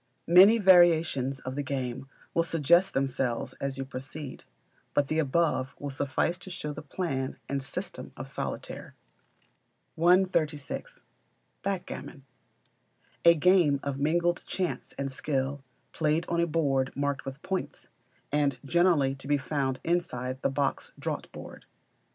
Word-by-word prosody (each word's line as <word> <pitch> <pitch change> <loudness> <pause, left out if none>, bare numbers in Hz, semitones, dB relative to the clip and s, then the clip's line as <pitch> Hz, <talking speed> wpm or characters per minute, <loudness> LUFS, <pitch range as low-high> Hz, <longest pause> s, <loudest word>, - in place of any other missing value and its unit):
Many 190 +6 +8
variations 165 - +4
of 130 +1 -5
the 145 - -1
game 135 -1 -4 0.2
will 170 - +3
suggest 170 +2 +3
themselves 135 -3 -1
as 140 0 -2
you 135 - -3
proceed; 135 +2 -8 0.5
but 145 -1 +2
the 155 - +1
above 150 -2 +1
will 145 -1 -5
suffice 145 +6 -1
to 185 - -10
show 150 -5 -5
the 155 - -7
plan 140 -4 -3
and 140 0 -2
system 135 - -6
of - - -6
Solitaire. - - -6 1.0
136. 175 - +1 0.6
Backgammon. 180 -7 -5 1.0
A 170 0 +8
game 160 -3 +4
of 140 -1 -3
mingled 170 +4 +1
chance 185 -3 -3
and 135 0 -2
skill, 135 0 -2 0.3
played 155 +1 +1
on 170 - 0
a 170 - +2
board 140 -5 +1
marked 145 0 -1
with 135 +1 -7
points, 190 -1 -4 0.4
and 145 -2 +1
generally 165 -4 +3
to 135 0 -9
be 145 0 +3
found 135 -1 -2
inside 130 -7 -1
the - - +1
box 140 0 -2
draughtboard. - - -6
145 Hz, 135 wpm, -28 LUFS, 135-170 Hz, 1.0 s, Many